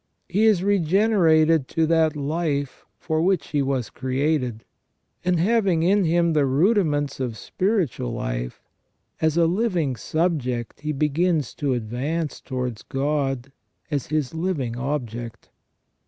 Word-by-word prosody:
He 205 +5 +2
is 205 -5 +4
regenerated 170 -6 +3
to 160 - +1
that 160 -1 +2
life 145 -1 -2
for 160 -1 -1
which 180 -4 +1
he 145 - +1
was 135 -5 -1
created, 130 -2 -1 0.6
and 180 -2 +1
having 190 -3 +2
in 195 +2 +3
him 170 0 +2
the 145 -3 +3
rudiments 145 - +1
of 120 -4 -3
spiritual 185 - -1
life, - - -4 0.6
as 160 0 +2
a 170 - +5
living 175 - 0
subject 130 -6 -2
he 155 +1 -2
begins 150 0 0
to 140 -3 -1
advance 135 +8 -3
towards 125 -4 -4
God 135 -2 -2 0.4
as 145 -4 -1
his 155 -2 -1
living 160 -8 -2
object. 120 -4 -5
150 Hz, 125 wpm, -23 LUFS, 130-170 Hz, 0.6 s, a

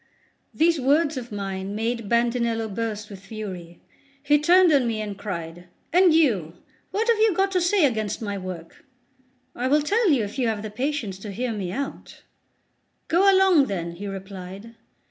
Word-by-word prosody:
These 330 -2 +2
words 295 +4 +2
of 245 -3 -6
mine 195 -1 -4
made 230 -1 -2
Bandinello 235 -1 +1
burst 215 -1 -3
with 195 - -9
fury; 190 -4 -8 0.4
he 295 +1 +4
turned 350 +2 +5
on 265 -4 +3
me, 225 -2 -2
and 210 -2 -4
cried: 175 -3 -6 0.3
"And 360 0 +6
you, 220 - +2 0.3
what 445 +3 -1
have 465 -2 +3
you 435 -4 +3
got 390 +1 +1
to 365 -1 +1
say 350 -1 +3
against 220 -6 -1
my 205 -3 -4
work?" 185 -3 -8 0.7
"I 250 - -1
will 295 +2 +3
tell 420 +6 +2
you 270 -8 +3
if 205 +6 -6
you 245 - +1
have 220 -2 -2
the 215 - -6
patience 250 -5 -3
to 205 +1 -7
hear 235 +4 -3
me 190 -4 -4
out." 275 +7 -6 0.9
"Go 385 +4 +5
along 380 -7 +5
then," 170 -4 -3
he 190 +4 -7
replied. 195 +2 -8
230 Hz, 175 wpm, -24 LUFS, 195-300 Hz, 0.9 s, And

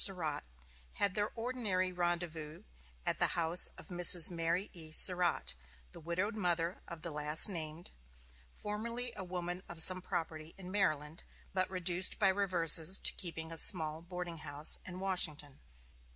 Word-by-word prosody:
Surratt, 170 -7 -1 0.5
had 200 -2 +1
their 205 +2 -2
ordinary 225 -6 -3
rendezvous 175 -3 -4 0.4
at - - -2
the - - 0
house 170 +1 +3
of - - -12
Mrs. 175 -1 +3
Mary 170 +3 -2
E. 160 -3 -11
Surratt, 180 +2 +3 0.4
the - - -10
widowed 170 +7 -3
mother 175 -4 -3
of 170 -2 -11
the 170 - -5
last 150 +3 +5
named, 165 -3 -7 0.6
formerly 230 - -6
a 195 - -7
woman 180 0 -6
of 165 -2 +3
some 185 0 +9
property 160 -2 -6
in 185 -1 -10
Maryland, 155 -6 -2 0.3
but 185 -1 -2
reduced 180 0 +2
by 200 -3 +2
reverses 180 -3 +2
to - - +4
keeping 165 -3 -6
a 165 - -6
small 160 -4 +3
boarding 175 -1 -7
house 145 0 +2
in 180 0 -8
Washington. 155 -7 -1
175 Hz, 150 wpm, -33 LUFS, 160-185 Hz, 0.6 s, some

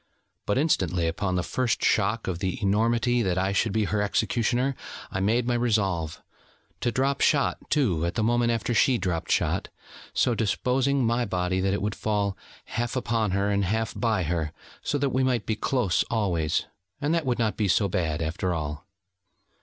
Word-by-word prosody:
But 105 - +1
instantly 95 - +1
upon 90 +3 -1
the 90 - 0
first 125 +2 -1
shock 110 +2 +1
of 90 -3 -2
the 90 0 -2
enormity 115 +4 +2
that 95 -5 0
I 95 +1 +1
should 100 +2 +1
be 110 +1 +1
her 105 0 0
executioner, 120 +6 +1 0.4
I 95 - -2
made 110 +5 +2
my 120 - +1
resolve: 100 -9 0 0.6
to 120 - 0
drop 135 +3 0
shot, 145 -2 +3
too, 105 - +1
at 85 - -3
the 110 - +1
moment 120 +1 +2
after 115 +1 -1
she 125 +2 +4
dropped 90 -5 -2
shot, - - +1 0.4
so 120 - +2
disposing 125 +5 +1
my 120 +2 +1
body, 95 -2 -1
that 95 +1 +1
it 100 - -3
would 105 0 -1
fall 100 -2 -1 0.3
half 120 +1 -3
upon 115 -4 0
her, 100 +1 +1
and 100 0 +1
half 110 +4 -1
by 110 -6 +1
her, 80 -1 -2 0.3
so 145 - -1
that 140 0 +1
we 130 - +1
might 125 -5 +1
be 110 - 0
close 110 -4 +1
always: 85 -8 0 0.3
and 145 +2 0
that 165 -4 0
would 125 - +1
not 110 -4 0
be 105 - 0
so 100 +2 +3
bad, 80 -3 -1
after 85 +3 -1
all. 75 +2 -5
105 Hz, 185 wpm, -26 LUFS, 95-120 Hz, 0.6 s, she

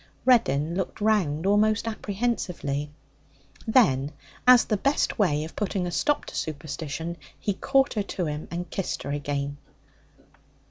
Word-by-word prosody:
Reddin 160 - +3
looked 190 +3 -3
round 190 -7 +1
almost 215 +2 +3
apprehensively. 195 -10 -2 0.8
Then, 145 - +4 0.4
as 250 -1 +8
the 215 - +1
best 275 +3 +1
way 150 -7 +2
of 160 - -8
putting 195 -3 -1
a 175 - -3
stop 295 +11 +1
to - - -9
superstition, 155 +2 -4 0.2
he 205 - -1
caught 270 +6 +2
her 210 - 0 0.2
to 180 - 0
him 150 0 -4
and 175 +1 -4
kissed 195 - -3
her 140 - -4
again. 145 0 -2
180 Hz, 140 wpm, -26 LUFS, 150-215 Hz, 0.8 s, as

